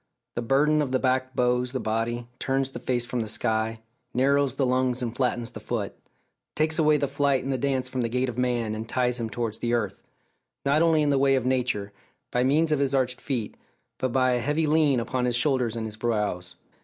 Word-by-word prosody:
The 120 - -2
burden 145 +5 +3
of 140 -3 -2
the 130 - +3
back 130 0 0
bows 125 0 +1
the 130 - -1
body, 115 +2 -2
turns 135 0 0
the - - -7
face 120 -2 -1
from 125 0 -3
the 110 - -2
sky, 110 +1 -1 0.3
narrows 140 +1 +2
the 135 - +1
lungs 130 0 +1
and 115 -1 -3
flattens 120 -3 -1
the - - -8
foot; - - -3 0.6
takes 155 +1 +1
away 155 -1 +4
the 140 - 0
flight 140 -1 +1
and 135 +1 -1
the - - 0
dance 135 -1 0
from 130 - -3
the 115 - 0
gait 125 +2 0
of 125 - -4
man, 120 -3 0
and 110 +1 -5
ties 125 -1 0
him 115 -1 -2
towards 115 -1 -3
the 120 0 -1
earth 105 -4 -2 0.6
not 145 +3 +3
only 165 -2 +4
in 145 - +2
the 140 - +3
way 135 0 +4
of 130 -2 0
nature, 125 -6 0 0.4
by 125 - +2
means 155 +5 +3
of 150 - +2
his 140 -1 +1
arched 130 -1 0
feet, 120 -7 -3 0.4
but 130 - 0
by 130 0 +3
a 125 - +1
heavy 150 +6 0
lien 150 -4 +3
upon 125 +2 -1
his 120 -1 +1
shoulders 120 -2 +1
and 115 -1 -3
his 110 -1 -5
brows. 105 -6 -2
125 Hz, 225 wpm, -26 LUFS, 120-135 Hz, 0.6 s, away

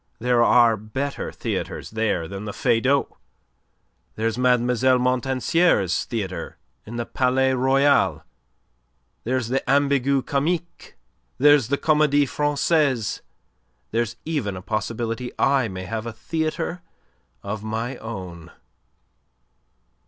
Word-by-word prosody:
There 120 +1 +2
are 120 -2 +5
better 130 +7 -4
theatres - - -4
there 110 -7 -1
than 100 +3 -7
the 105 - -5
Feydau. 130 +5 +1 1.0
There's 110 0 -1
Mlle. 125 0 +3 0.4
Montansier's 125 - +1
theatre 100 -6 -5 0.3
in 115 - -7
the 120 0 -2
Palais 130 +1 +1
Royal; 130 - +2 1.0
there's 125 -1 -1
the 135 +2 +1
Ambigu 140 -1 +2
Comique; 165 +5 -2 0.4
there's 145 -3 +5
the 140 +2 0
Comedie 150 -2 +3
Francaise; 145 -4 0 0.7
there's 115 0 -1
even 140 - -2
a 90 - -9
possibility 115 +3 -3
I 135 -3 +2
may 95 -2 -6
have 110 +4 -4
a 115 - -5
theatre 160 +6 -3 0.6
of 100 +1 -5
my 115 +4 -3
own." 90 -7 -8
125 Hz, 110 wpm, -23 LUFS, 110-140 Hz, 1.0 s, are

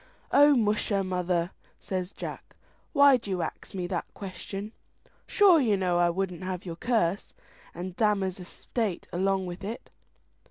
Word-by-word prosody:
"O 290 0 +7
musha, 210 -3 +1
mother," 180 -1 -1 0.3
says 185 -1 -3
Jack, - - -8 0.4
"why 280 -3 +7
do 225 -4 -9
you 180 -3 -1
ax - - -7
me 180 -2 -2
that 175 -1 -3
question? 195 +2 -6 0.6
sure 390 -6 +6
you 220 -7 +2
know 180 -2 +1
I 175 0 +4
wouldn't 180 0 -2
have 185 0 -4
your 170 -2 -5
curse 200 -2 0 0.4
and 180 +1 -6
Damer's 195 -4 +1
estate 195 +2 -3
along 190 +1 +1
with 180 +2 -7
it." 220 +5 -6
190 Hz, 150 wpm, -28 LUFS, 180-215 Hz, 0.6 s, O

